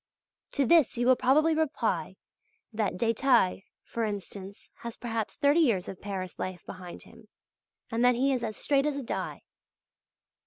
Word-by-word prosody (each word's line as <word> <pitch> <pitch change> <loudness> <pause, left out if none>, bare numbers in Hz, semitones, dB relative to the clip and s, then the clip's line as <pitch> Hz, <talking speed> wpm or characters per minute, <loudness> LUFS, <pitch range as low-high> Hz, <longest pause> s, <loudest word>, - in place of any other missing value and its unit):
To 280 - +2
this 310 -3 +4
you 240 - +1
will 255 +1 +6
probably 295 +6 +3
reply 315 -2 -1 0.6
that 210 -2 -1
Détaille, 230 -3 +2 0.2
for 230 - -3
instance, 200 -1 -6
has 235 -1 -7
perhaps 225 -3 -3
thirty 290 +2 +3
years 230 - +2
of 190 - -8
Paris 190 -3 -5
life 185 -1 -5
behind 180 -2 -9
him, 225 -1 -17 0.6
and 230 +1 0
that 250 0 +5
he 270 +3 +2
is 250 -2 -2
as 215 -2 -3
straight 280 0 +2
as 295 - -1
a 280 - -4
die. - - -4
235 Hz, 160 wpm, -29 LUFS, 205-275 Hz, 0.6 s, will